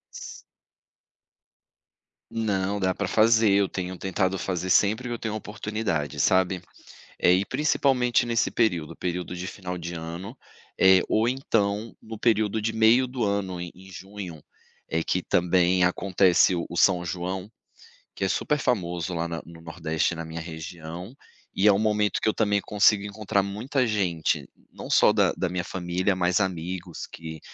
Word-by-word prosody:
S - - -8 1.9
Não, 100 -2 -1
dá 95 -1 +1
para 100 0 -3
fazer. 110 0 +4
Eu 100 -1 +3
tenho 90 -1 -5
tentado 95 0 -1
fazer 90 +2 -3
sempre 110 +6 +3
que - - -2
eu - - -3
tenho 110 -2 -3
oportunidade, 105 - -3
sabe, 95 -1 +2 0.6
eh, 90 - +4
e 95 +2 +2
principalmente 130 -4 +2
nesse 115 -4 +1
período, 90 -10 0
período 90 0 -3
de 90 +1 -5
final 90 -2 -6
de 85 0 -6
ano, 85 +9 -7 0.4
eh, 95 0 +7
ou 110 +2 +2
então 110 -4 -1
no 110 -1 -9
período 110 -2 +2
de 110 +1 -1
meio 115 +3 +4
do 125 -1 -3
ano 100 -3 -1
em 85 - -6
em 95 +1 -15
junho, 95 -4 -9 0.5
é 80 0 0
que 90 - -1
também 90 +1 +3
acontece 90 0 +3
o 85 - -2
o - - -7
São 90 -1 +3
João, 90 +3 -4 0.6
que - - -5
é 95 - +1
super 150 -1 0
famoso 90 -7 -1
lá 85 +1 -1
na 85 0 -5
no 85 0 -13
Nordeste, 80 0 -1
na 85 0 -5
minha 80 +1 -6
região, 85 - -8 0.4
e 100 +3 +3
é 100 - +7
um 100 - +1
momento 105 -1 +1
que 110 - +2
eu - - -1
também 100 -2 +1
consigo 105 -1 +3
encontrar 100 -1 -1
muita 120 +6 -1
gente, 90 -7 0 0.2
não - - -8
só - - +6
da - - +3
da 90 - -1
minha 90 -1 -2
família, 90 +2 -1
mas 90 +1 +2
amigos 90 -1 -4
que 80 -1 -9
95 Hz, 165 wpm, -26 LUFS, 90-105 Hz, 1.9 s, eh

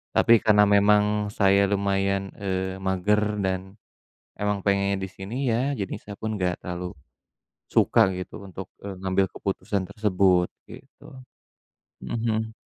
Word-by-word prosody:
Tapi 115 -1 +5
karena 105 -2 +5
memang 105 +1 +3
saya 100 -1 +3
lumayan, 100 -1 0
eee, 95 -1 -3
mager 95 +3 +1 0.2
dan 95 +2 -3 0.6
emang 105 -1 -1
pengennya 100 0 +2
di 95 - -4
sini 95 +5 -8 0.2
ya, 130 +5 0
jadi 100 - -3
saya 100 -1 -9
pun 110 0 -2
nggak 90 -1 -1
terlalu 90 0 -5 0.8
suka - - +4 0.2
gitu 90 - -7
untuk, 95 0 -8 0.2
e 100 - -6
ngambil 95 0 +2
keputusan 95 -1 -3
tersebut, 95 -4 +2 0.2
gitu. - - -14 1.0
Mhm 115 - -3
mhm. 110 0 -1
100 Hz, 130 wpm, -25 LUFS, 95-105 Hz, 1.0 s, Tapi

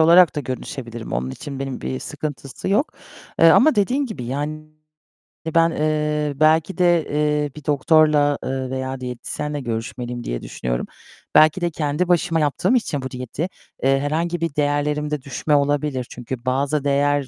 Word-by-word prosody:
olarak 170 +1 +6
da - - 0
görüşebilirim. 125 -3 -6
Onun 65 +2 -1
için 135 - -7
benim 135 -2 -4
bir 65 0 -4
sıkıntısı 145 - -5
yok. 210 +10 +1 0.5
Eee, 165 - +8
ama 305 - +6
dediğin 255 +8 +1
gibi, 215 - -6
yani, 145 +5 -3 0.9
ben, 165 0 +5
eee, 150 -1 0
belki 160 +4 +3
de, 175 -3 +3
eee, 150 0 0
bir 150 -2 -11
doktorla, 150 0 +4
eee, 130 0 -3
veya 130 0 -3
diyetisyenle 130 +4 -4
görüşmeliyim, 120 +1 -4
diye - - -3
düşünüyorum. - - -3 0.5
Belki 155 +4 +6
de 175 - +1
kendi 150 +3 -1
başıma 175 -1 +2
yaptığım 160 - +1
için 165 - 0
bu 130 0 -6
diyeti, 130 +6 -4 0.4
eee, 135 +1 +3
herhangi 165 +4 -1
bir 165 -4 -2
değerlerimde 150 0 0
düşme 140 +3 -1
olabilir. 140 -3 0
Çünkü 125 +1 -5
bazı 135 +3 0
değer 145 0 +2
145 Hz, 155 wpm, -21 LUFS, 130-155 Hz, 0.9 s, Eee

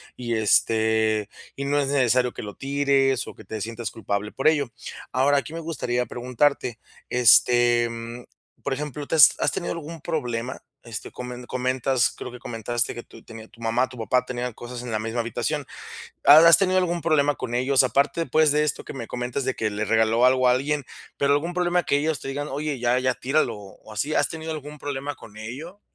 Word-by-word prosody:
y, 120 -2 -3
este, 110 0 +2 0.3
y 140 - -3
no 145 +1 +1
es 140 - 0
necesario 125 -2 +2
que - - -7
lo 105 -1 -8
tires 135 -1 +1
o - - -9
que - - -13
te 110 +2 -6
sientas 115 +2 -5
culpable 105 -1 -3
por - - 0
ello. 145 -6 +2 0.4
Ahora, 140 +2 +3
aquí 140 +3 -8
me 165 - -4
gustaría 125 -7 -2
preguntarte, 125 -1 -1 0.3
este, 120 0 +5
mm, 115 +1 -7 0.4
por 140 - -1
ejemplo, 150 +1 -5
¿te - - -1
has 150 -5 +8
has - - +2
tenido 175 - -3
algún 165 0 -7
problema? 125 -5 -3 0.2
Este, 115 -4 -7
comen 125 0 -7
comentas 130 0 0
creo 125 - -7
que 125 - -10
comentaste 120 0 -2
que 120 - -7
tu 115 - -16
tenía 110 -1 -11
tu - - -21
mamá, 115 +3 +1
tu 125 - -12
papá 125 +2 +1
tenían 125 -1 -4
cosas 120 +2 -8
en 125 -1 -6
la 110 - -1
misma 115 +2 -3
habitación. 115 -1 -2 0.6
¿Has 160 +3 +9
tenido 185 -1 +2
algún 175 -2 0
problema 145 -3 +2
con 125 -2 -5
ellos? 130 +2 +3
Aparte, 140 +6 +1
pues, 155 -2 +3
de 150 0 +3
esto 150 - -2
que - - -7
me 120 -5 -6
comentas 125 +2 -3
de 130 0 -1
que 110 - -1
le 105 +1 -3
regaló 110 +2 +3
algo 130 0 +4
a - - +6
alguien, 140 +3 0 0.3
pero 140 0 +3
algún 160 +5 -1
problema 180 0 +1
que 140 - +1
ellos 155 -1 -1
te - - -7
digan: 145 +2 -4
"Oye, 145 0 -3
ya 120 +1 +2
ya 130 0 +1
tíralo", 130 -2 0
o 100 +1 -14
así, 140 +9 -2
¿has - - +2
tenido 160 0 -6
algún 150 0 -8
problema 145 0 -4
con 105 - -15
ello? 140 - -8
125 Hz, 205 wpm, -24 LUFS, 115-145 Hz, 0.6 s, Has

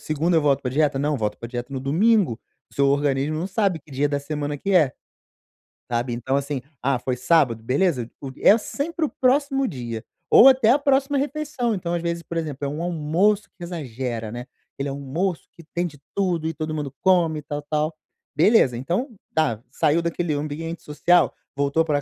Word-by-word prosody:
segunda 160 +3 0
eu 160 - +3
volto 140 -2 +3
pra 125 - -2
dieta, 145 0 +1
não, 145 +1 0
volto 105 -3 -2
pra 115 - -6
dieta 120 +1 -5
no 135 - -2
domingo". 170 - +2 0.3
O - - -17
seu 140 - +3
organismo 140 +1 +1
não 170 - -2
sabe 195 -3 0
que 145 - -22
dia 140 +2 +1
da 145 0 0
semana 145 0 -3
que 200 +7 -2
é, 155 -8 +5 1.0
sabe, 120 +1 -1
então 125 +3 -1
assim, 140 -1 -2 0.2
"ah, 135 0 +2
foi 125 +1 -2
sábado", 125 -4 +2
beleza, 130 -1 +1
o 135 - -6
é 210 - +6
sempre 310 +8 -2
o - - -3
próximo 275 +1 +3
dia, 120 - -5 0.3
ou 260 - +9
até 255 -4 +4
a 265 - +5
próxima 280 0 +2
refeição. 280 -3 -1
Então 175 -4 -3
às 170 - -1
vezes, 170 0 -2
por 170 - -7
exemplo, 145 -4 -3
é - - -1
um 150 +3 -4
almoço 175 +5 +1
que 175 - -9
exagera, 125 -9 -4
né, 120 +2 -6 0.3
aquele 140 +1 -4
almoço 140 +6 -3
que 170 - -15
tem 175 +1 +1
de 150 -5 -7 0.2
tudo, 175 -5 0
e 160 - -2
todo 155 0 -4
mundo 145 -3 -3
come, 175 -4 +3
e - - -7
tal, 145 0 -4
tal. 155 +2 -1 0.4
Beleza, 155 - +4
então 175 - -2 0.3
tá, 145 -9 +1
saiu 155 +4 +2
daquele 170 -1 -1
ambiente 155 +3 -4
social, 170 +4 +2 0.2
voltou 140 +3 +2
pra 145 -2 +1
155 Hz, 200 wpm, -23 LUFS, 140-180 Hz, 1.0 s, ou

